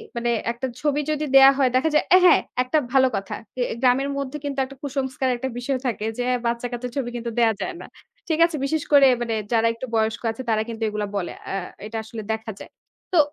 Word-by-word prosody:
মানে 235 0 -1 0.2
একটা 240 +3 -4
ছবি 295 -1 +1
যদি 305 0 -1
দেয়া 270 0 +9
হয় 265 -2 +3
দেখা 260 +5 +3
যায়, - - +3 0.2
হ্যাঁ, - - +7 0.2
একটা 255 +5 0 0.2
ভালো 260 -1 +5
কথা। 195 0 -4 0.2
এ - - +2 0.2
গ্রামের 265 +2 +3
মধ্যে 275 +1 -4
কিন্তু 280 -1 -3
একটা 275 +1 -12
কুসংস্কার 265 -2 -2
একটা 265 +2 -3
বিষয় 260 +2 -1
থাকে 220 -3 -2
যে - - +1 0.2
বাচ্চাকাচ্চার 240 +1 -3
ছবি 245 -3 -1
কিন্তু 235 -1 -4
দেয়া 230 -1 +4
যায় 365 - -3
না, - - -9 0.4
ঠিক 320 -1 0
আছে? 335 -2 -3
বিশেষ 310 +2 -1
করে 280 -2 +7
মানে 230 -2 -1 0.2
যারা 230 0 +3
একটু 230 +3 -7
বয়স্ক 220 0 0
আছে 225 - -7
তারা 215 -1 +2
কিন্তু 225 0 -5
এগুলা 210 -1 -3
বলে। 180 - -3 0.2
আ - - -3 0.3
এটা 225 +1 -5
আসলে 220 0 -7
দেখা 220 0 -5
যায়। - - -11 0.4
তো 350 - +4
250 Hz, 210 wpm, -23 LUFS, 230-275 Hz, 0.4 s, দেয়া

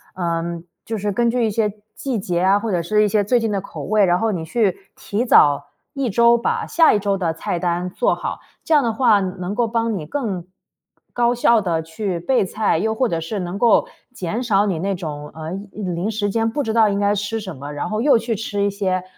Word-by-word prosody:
嗯， 170 -1 -3 0.2
就 225 -1 -3
是 205 +1 -2
根 235 +2 +2
据 240 -1 +1
一 - - +1
些 210 0 0 0.2
季 255 -6 -2
节 175 -2 -1
啊， 195 +2 +4
或 230 - -3
者 175 -2 +1
是 210 +5 +2
一 210 - +3
些 205 0 +2
最 245 +4 +2
近 225 -1 -1
的 195 -2 -1
口 - - -8
味， 215 -1 +2
然 175 0 +2
后 225 -1 +1
你 165 -3 -3
去 195 +2 +1 0.2
提 210 +4 -2
早 145 - +5 0.3
1 275 -4 -1
周 235 +3 +5
把 235 - -1
下 330 -1 +5
1 205 - +2
周 200 -1 0
的 170 -3 0
菜 170 +2 -3
单 175 +1 -1
做 - - +1
好， - - -5 0.3
这 320 - +1
样 290 - +4
的 230 - +1
话 220 -3 +4
能 185 +1 -4
够 240 - +2
帮 230 -2 -1
你 155 - -6
更 200 - -3 0.7
高 240 0 +2
效 235 -2 +4
地 170 -3 -1
去 170 +2 -4
备 245 +2 +1
菜， 210 -1 0
又 220 +6 0
或 255 +1 +1
者 165 - -1
是 195 +6 -4
能 180 +1 -4
够 235 +1 +4 0.3
减 220 +3 -3
少 205 -3 +2
你 185 -6 -1
那 195 +2 -1
种 150 -4 -6
呃 160 +1 -6 0.2
一 210 - -8
临 180 +3 -2
时 205 -1 -1
间 225 +2 0
不 290 +5 -2
知 220 -3 -2
道 225 -2 +5
应 200 0 -1
该 205 0 +2
吃 205 +2 -2
什 190 -7 -7
么， 140 +2 -8
然 145 - -4
后 215 0 -1
又 275 -2 +5
去 225 0 -2
吃 205 -1 -3
一 200 - +2
些 190 -2 -1
205 Hz, 255 characters per minute, -20 LUFS, 180-225 Hz, 0.7 s, 早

